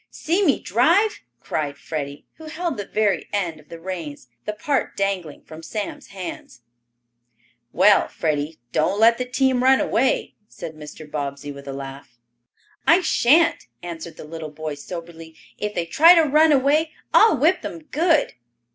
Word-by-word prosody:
"See 350 +6 -1
me 290 -8 +3
drive!" 335 - +2 0.2
cried 145 0 -3
Freddie, 145 -2 -6
who 320 - -12
held 330 +1 -3
the 205 - -5
very 210 -3 0
end 175 -6 -2
of 150 - -21
the 170 - -9
reins, 165 -7 -7 0.2
the 210 - -2
part 270 +6 -2
dangling 190 -6 -2
from 160 0 -11
Sam's 205 +4 -6
hands. 180 -9 -8 1.1
"Well, 200 +3 +5
Freddie, 155 0 -2
don't 190 +6 +1
let 230 +2 +5
the 250 - -1
team 255 0 +1
run 265 +1 +5
away," 255 +3 0
said 160 - -8
Mr. 155 0 -11
Bobbsey, 145 -1 -5
with 140 0 -11
a 135 - -5
laugh. 135 -2 -9 0.7
"I 340 +3 +6
shan't," 320 0 +3 0.2
answered 170 -1 -7
the - - -9
little 160 0 -7
fellow 155 0 -5
soberly. 165 +1 -9 0.2
"If 210 0 -3
they 170 - -1
try 325 - +7
to 330 - +5
run 305 +2 +4
away, 295 +3 +2 0.2
I'll 435 -9 +6
whip 325 +8 +3
them 330 - -7
good." 320 +1 +1
195 Hz, 160 wpm, -22 LUFS, -, 1.1 s, try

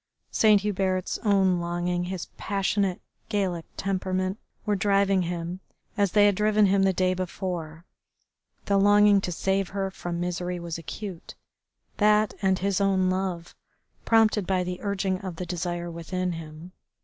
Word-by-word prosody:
Saint 215 -2 +5
Hubert's 190 -2 -1
own 195 -4 +3
longing, 175 +1 -1
his 180 -1 -4
passionate, 195 -2 0 0.3
Gallic 190 -6 -1
temperament, 185 +1 -1 0.3
were 210 -1 +1
driving 195 0 +2
him 175 +1 -4 0.4
as 200 -4 +1
they 205 -1 +6
had 205 - +5
driven 210 +1 +3
him 195 0 +3
the 195 0 +4
day 185 0 +1
before. 175 -3 -5 0.8
The 200 -1 +2
longing 205 0 +5
to 180 - -3
save 195 +2 0
her 195 -1 -2
from 175 -2 -5
misery 180 0 -3
was 170 -1 -5
acute, 165 +4 -7 0.6
that, 210 0 +3
and 190 -1 +2
his 200 +1 0
own 190 -2 +2
love, 185 -2 -3 0.5
prompted 220 -4 +3
by 185 -1 +1
the 180 0 -4
urging 195 -2 -1
of 185 -3 -6
the 180 - -5
desire 175 0 -3
within 180 +2 -3
him. 165 +1 -8
185 Hz, 150 wpm, -26 LUFS, 175-200 Hz, 0.8 s, they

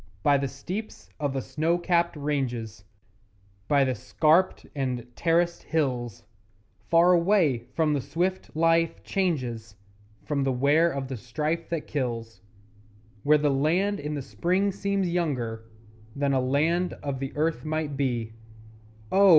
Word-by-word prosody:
By 145 -1 +4
the 140 - -1
steeps 180 - -7
of 145 -2 -1
the 135 -2 -2
snow 155 +6 0
capped 170 -1 +1
ranges, 120 -8 -3 0.8
By 140 -1 +4
the 130 -1 +1
scarped 160 - +2
and 125 -4 -2
terraced 170 +1 +1
hills 125 -8 -2 0.7
Far 170 +2 +6
away 170 - +3
from 155 -2 +2
the 145 - 0
swift 180 +5 -2
life 165 +1 +2
changes, 125 - -2 0.5
From 145 -2 0
the 135 - +1
wear 145 +6 +3
of 135 -1 -4
the 130 -1 -5
strife 150 +8 -3
that 165 -3 -2
kills 115 -5 -3 0.8
Where 150 +5 +5
the 145 -1 +2
land 175 +9 +1
in 150 +1 -3
the 140 - -4
Spring 185 +8 0
seems 200 -1 -1
younger 130 -11 -2 0.5
Than 140 0 +1
a 130 - +2
land 160 +7 +1
of 140 -2 -3
the 135 0 -4
Earth 160 +1 0
might 155 -2 -2
be 120 -5 -1 0.8
Oh! 195 0 +6
150 Hz, 140 wpm, -26 LUFS, 130-170 Hz, 0.8 s, Far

